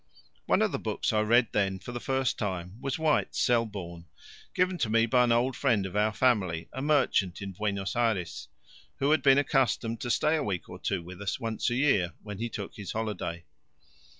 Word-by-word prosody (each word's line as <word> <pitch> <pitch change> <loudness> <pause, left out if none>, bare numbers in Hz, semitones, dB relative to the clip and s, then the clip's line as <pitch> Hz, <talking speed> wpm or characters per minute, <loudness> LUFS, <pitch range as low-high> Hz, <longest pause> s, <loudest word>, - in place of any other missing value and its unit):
One - - +3
of - - +1
the - - -2
books - - -2
I 105 - +3
read 120 +3 +4
then 95 -2 0
for 110 - -9
the 120 - -4
first 130 0 -1
time 95 +1 -4
was 135 -1 -2
White's 160 -1 +1
Selborne, 100 -8 -1 0.5
given 180 -1 +1
to 110 - 0
me 115 +1 +4
by 125 +2 +4
an 120 - +1
old 120 +2 +2
friend 115 -9 +1
of 95 - -6
our 105 +1 +2
family, 95 -9 +1
a 130 - -4
merchant 135 - +2
in 100 -1 -5
Buenos 100 0 -2
Ayres, 110 -7 -1 0.5
who 140 +2 +1
had 155 - +4
been 135 -1 +6
accustomed 125 -5 +1
to 120 - -3
stay 150 +6 +2
a 150 - -1
week 95 -4 -3
or - - -10
two 85 - -2
with 90 +3 -10
us 100 - -2
once 115 +2 -1
a 120 - -1
year 120 -10 +2
when 105 -2 -7
he 115 +1 -2
took 100 -3 -7
his 100 -3 -6
holiday. 100 -6 -4
110 Hz, 205 wpm, -28 LUFS, 95-130 Hz, 0.5 s, been